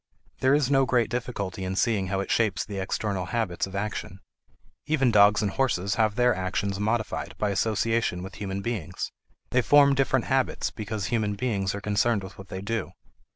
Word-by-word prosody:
There 130 Hz, +2 st, +4 dB
is 145 Hz, -2 st, +1 dB
no 135 Hz, -1 st, +5 dB
great 120 Hz, -3 st, +2 dB
difficulty 115 Hz, -7 st, -3 dB
in 95 Hz, 0 st, -3 dB
seeing 100 Hz, -3 st, +1 dB
how 95 Hz, +1 st, -1 dB
it -, -, -4 dB
shapes 110 Hz, -4 st, +1 dB
the 100 Hz, -2 st, -5 dB
external 95 Hz, -1 st, -2 dB
habits 100 Hz, -4 st, -1 dB
of 95 Hz, -, -9 dB
action. 100 Hz, -2 st, -4 dB, 0.7 s
Even 135 Hz, -5 st, +2 dB
dogs 105 Hz, 0 st, +5 dB
and 100 Hz, -, 0 dB
horses 100 Hz, -7 st, 0 dB
have 110 Hz, -2 st, +1 dB
their 125 Hz, 0 st, +4 dB
actions 95 Hz, +1 st, -2 dB
modified 110 Hz, +1 st, -2 dB
by 105 Hz, -1 st, 0 dB
association 110 Hz, -2 st, 0 dB
with 95 Hz, 0 st, -8 dB
human 100 Hz, -1 st, -3 dB
beings; 95 Hz, -7 st, -4 dB, 0.4 s
they 125 Hz, -, +3 dB
form 140 Hz, +2 st, +6 dB
different 135 Hz, -2 st, +1 dB
habits 130 Hz, 0 st, 0 dB
because 105 Hz, -2 st, -4 dB
human 105 Hz, -3 st, 0 dB
beings 100 Hz, -4 st, -1 dB
are 100 Hz, -, -5 dB
concerned 105 Hz, +1 st, +1 dB
with 95 Hz, -, -9 dB
what 95 Hz, -, -10 dB
they 95 Hz, -, -6 dB
do. 115 Hz, +3 st, -3 dB
105 Hz, 185 wpm, -26 LUFS, 95-120 Hz, 0.7 s, form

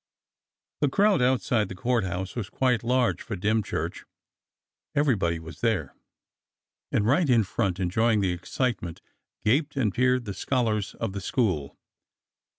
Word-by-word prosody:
The 145 Hz, -, +2 dB
crowd 200 Hz, +3 st, +3 dB
outside 125 Hz, -4 st, +2 dB
the 95 Hz, -, -6 dB
Court 120 Hz, +3 st, +1 dB
House 95 Hz, +1 st, -4 dB
was 110 Hz, -6 st, -4 dB
quite 125 Hz, -4 st, +1 dB
large 125 Hz, +1 st, +1 dB
for 115 Hz, -, -5 dB
Dymchurch. 105 Hz, +3 st, -1 dB, 0.9 s
Everybody 110 Hz, -, +2 dB
was 80 Hz, 0 st, -10 dB
there, 110 Hz, -, 0 dB, 1.0 s
and 105 Hz, -, +1 dB
right 145 Hz, +6 st, +3 dB
in 115 Hz, -3 st, +5 dB
front 95 Hz, -1 st, -1 dB
enjoying 110 Hz, +5 st, +2 dB
the 95 Hz, -2 st, +1 dB
excitement 90 Hz, 0 st, -3 dB, 0.4 s
gaped 145 Hz, +7 st, +2 dB
and 115 Hz, -8 st, +1 dB
peered 125 Hz, 0 st, +2 dB
the 100 Hz, -, -4 dB
scholars 110 Hz, -1 st, -1 dB
of 95 Hz, -, -3 dB
the 100 Hz, -, -4 dB
school. 90 Hz, -, -1 dB
110 Hz, 140 wpm, -26 LUFS, 95-125 Hz, 1.0 s, in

